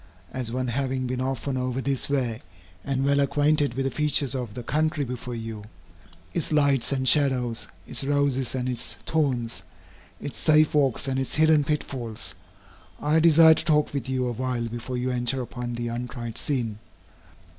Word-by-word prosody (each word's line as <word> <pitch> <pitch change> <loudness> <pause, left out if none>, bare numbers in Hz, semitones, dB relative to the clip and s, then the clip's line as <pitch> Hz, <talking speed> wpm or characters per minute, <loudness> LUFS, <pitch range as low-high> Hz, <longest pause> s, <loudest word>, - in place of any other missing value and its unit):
As 125 -3 -1
one 130 0 -2
having 130 +1 -1
been 125 0 -2
often 135 +1 -2
over 125 0 -2
this 135 0 0
way, 125 -6 -1 0.4
and 135 -1 -1
well 140 0 +3
acquainted 145 -1 +2
with 135 0 -1
the 135 - 0
features 145 -3 +1
of 120 -5 -4
the 125 - -5
country 155 +3 0
before 125 -1 -5
you, 115 -2 -6 0.7
its 165 - -2
lights 140 -5 +3
and 130 -1 0
shadows, 125 -3 +2 0.2
its - - -1
roses 140 -2 +1
and 125 -1 -2
its 125 -2 -4
thorns, 125 -9 0 0.6
its 145 - -6
safe 155 -1 +4
walks 140 -3 +2
and 135 0 0
its 135 - -1
hidden 155 -1 +5
pitfalls, 130 -6 -4 0.7
I 150 +2 +2
desire 160 0 +7
to - - -1
talk 150 -2 +2
with 140 -2 -3
you 130 -1 0
a 125 - -1
while 125 0 -2
before 120 +2 -5
you 125 +1 -1
enter 125 +1 0
upon 120 -1 -5
the 120 0 -3
untried 120 -1 -5
scene. 115 -7 -2
130 Hz, 170 wpm, -25 LUFS, 120-145 Hz, 0.7 s, desire